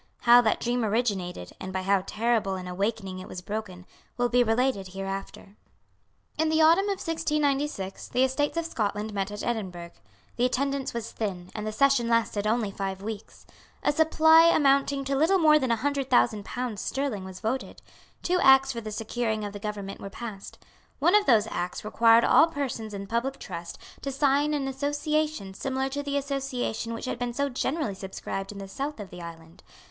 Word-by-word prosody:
How 240 0 +7
that 220 -3 +1
dream 245 0 0
originated, 200 - -1
and 190 - -6
by 190 0 -3
how 195 0 +3
terrible 220 -3 0
an 185 -1 -6
awakening 195 0 -2
it 185 - -9
was 180 - -7
broken, 185 -2 -6 0.3
will 245 0 +1
be 245 +1 +4
related 225 -3 +1
hereafter. 195 +1 -6 0.8
In 320 0 +2
the 315 0 +2
autumn 330 +5 +5
of 400 -1 -1
1696 295 - -1
the 255 - +1
Estates 275 +4 0
of 335 - 0
Scotland 215 -6 -2
met 195 -1 -1
at 205 0 -6
Edinburgh. 185 -7 -4 0.5
The 245 - +3
attendance 275 +1 -1
was 230 -1 -4
thin; 185 -5 -4
and 215 -1 -4
the - - -1
session 260 +1 +3
lasted 230 -3 +1
only 220 -2 +1
five 195 -1 -4
weeks. 215 -1 -7 0.4
A - - +3
supply 320 +1 +6
amounting 275 -3 +3
to 275 0 0
little 325 +8 +4
more 305 -3 +5
than 260 -3 -1
a 230 - +3
hundred 275 +2 -2
thousand 200 - +3
pounds 245 -5 -4
sterling 265 -8 -2
was 190 -1 -9
voted. 250 +5 -3 0.4
Two 360 +1 +1
Acts 270 -1 +6
for 235 -3 -5
the 215 -1 -6
securing 220 0 -2
of 205 - -6
the 205 - -7
government 200 -1 -5
were 195 - -6
passed. 200 -1 -8 0.4
One 335 +6 +3
of 420 0 +4
those 220 -4 +5
Acts 175 +3 -4
required 230 +1 +5
all 325 - +6
persons 255 -9 -4
in 200 0 -5
public 235 +6 -2
trust 170 -3 -7 0.2
to 275 - -3
sign 285 +2 +2
an 275 -2 -2
Association 290 -4 -1
similar 265 +5 -2
to 285 +2 -3
the 285 0 -2
Association 270 -5 -3
which - - -6
had 250 - -3
been 245 -1 -2
so 280 +1 0
generally 270 -1 -2
subscribed 195 0 -6
in 205 - -9
the 195 -1 -7
south 275 +7 -5
of 200 -2 -8
the 180 - -9
island. 165 +1 -11
235 Hz, 190 wpm, -27 LUFS, 200-275 Hz, 0.8 s, How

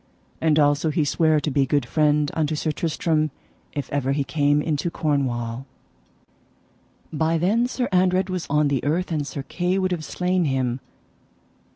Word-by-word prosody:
And 155 -2 +3
also 145 +1 +3
he 155 0 +1
sware 155 +1 +2
to 150 +1 -2
be 135 0 +2
good 145 -2 +1
friend 150 +2 +2
unto 155 -1 0
Sir 155 +1 -1
Tristram 155 0 0 0.4
if 145 - -3
ever 135 -1 0
he 140 0 0
came 145 +1 +2
into 150 +2 -1
Cornwall. 130 -6 -2 1.5
By 160 +2 +1
then 210 +9 +2
Sir 250 -1 -2
Andred 185 0 +2
was 185 -2 -4
on 150 0 +2
the 135 -3 0
earth, 170 +5 0
and 150 -3 -1
Sir 140 - -5
Kay 180 +6 -1
would 185 -1 0
have 170 -3 -2
slain 180 +1 0
him. 130 -3 0
150 Hz, 165 wpm, -23 LUFS, 145-170 Hz, 1.5 s, And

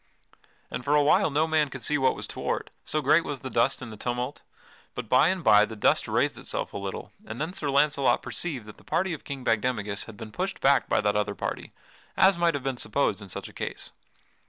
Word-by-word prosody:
And 125 - -4
for 145 +4 +2
a 145 - +5
while 145 - +4
no 150 +2 +2
man 155 -2 +2
could 130 -2 -8
see 150 -1 +2
what 130 - +3
was - - -3
toward, - - -3
so 155 -1 -1
great 150 +5 +5
was 145 -4 -5
the 130 - -6
dust 120 +3 +1
and 115 -2 -8
the - - -10
tumult. 125 +4 -3 0.5
But 125 -2 -5
by 125 +7 +5
and 185 0 -1
by 105 -6 +7
the 110 +1 -4
dust 105 - +2
raised - - 0
itself - - -4
a - - -4
little 100 -1 -6 0.2
and 110 - -6
then 160 +4 -3
Sir 150 -6 -2
Launcelot 140 0 +3
perceived 140 -10 -3
that 105 - -12
the - - -19
party 185 0 0
of 155 - -7
King 135 -2 -6
Bagdemagus 105 -3 0
had 110 - -11
been 110 - -8
pushed 190 - -3
back 140 0 +3
by - - +3
that 105 -1 +1
other 105 -1 0
party, - - -4 0.5
as 190 +1 +6
might 170 -2 +2
have 140 - -4
been 135 -2 -2
supposed 110 0 0
in 100 - -10
such - - -5
a - - -14
case. - - -6
135 Hz, 235 wpm, -27 LUFS, 110-150 Hz, 0.5 s, by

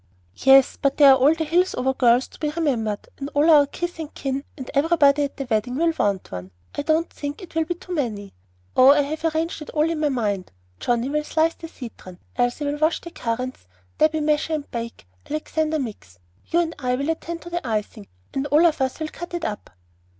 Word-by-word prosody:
"Yes; 270 0 +5
but 275 -1 +1
there 285 -2 +8
are - - +8
all 290 +5 +4
the 325 - -2
Hillsover 315 -5 +1
girls 245 0 +4
to - - -17
be 300 - -1
remembered, 250 -10 -1
and 280 0 -4
all 300 +3 +5
our 290 -2 +7
kith 345 +3 -5
and 310 -2 -5
kin, 275 0 -3
and 260 -3 -7
everybody 290 -1 +4
at 280 - -8
the 275 - -4
wedding 245 +2 0
will 330 +3 +2
want 200 -2 0
one. 90 0 -6 0.2
I - - -2
don't 315 +3 +1
think 290 0 -6
it 355 - -12
will 325 0 +1
be 350 +2 -2
too 360 +1 -8
many. 215 - -3 0.4
Oh, 255 - +7
I 290 +1 +6
have 310 +3 -5
arranged 320 0 -1
it 305 - -8
all 305 0 +1
in 330 -1 -2
my 300 -1 +2
mind. 205 -8 -2 0.3
Johnnie 240 +2 0
will 300 +1 0
slice 320 +2 +1
the 330 - -9
citron, 230 - -10 0.2
Elsie 245 +4 0
will 290 +1 -2
wash 315 +2 +2
the 340 - -9
currants, 245 - -4 0.3
Debby 315 0 +3
measure 300 +1 +1
and 300 -2 -4
bake, 230 - -6 0.2
Alexander 310 +1 -1
mix, 215 - -7 0.3
you 340 - +2
and 330 -1 -2
I 250 -2 0
will 280 +5 -1
attend 335 +1 -5
to 345 - -9
the 345 -6 -3
icing, 215 -1 -3 0.3
and 270 +1 -1
all 300 +4 +5
of 310 -4 +2
us 260 +2 -1
will 315 -1 -3
cut 345 +2 -7
it 345 - -3
up." 210 -1 -5
290 Hz, 220 wpm, -23 LUFS, 250-320 Hz, 0.4 s, there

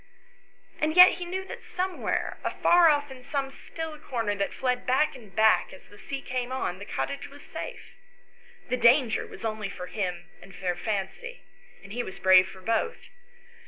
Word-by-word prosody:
And 310 +1 0
yet 360 0 +10
he 355 - -4
knew 375 +2 -4
that - - -8
somewhere, 370 0 -2
afar 345 -1 +5
off 290 -2 +1
in 260 -1 -10
some, 270 +1 -3
still 320 +1 -7
corner 230 -8 -2
that 200 -1 -2
fled 250 -1 -1
back 275 +3 +2
and 215 -8 -14
back 220 0 +4
as 190 - -13
the 205 - -17
sea 275 -1 -6
came 250 0 -3
on, 190 -8 -2
the 205 - -7
cottage 280 +6 -4
was 285 +1 -14
safe; - - -8 0.8
the 250 - +1
danger 245 -1 +4
was - - -9
only 215 -2 -3
for 180 -2 -7
him 180 -3 -4
and 195 - -14
for 180 -2 -1
Fancy, 210 - -4 0.4
and 190 +1 -10
he 245 - -1
was 190 - -7
brave 185 -1 +6
for 190 0 -12
both. 230 - -1
250 Hz, 180 wpm, -27 LUFS, 200-295 Hz, 0.8 s, yet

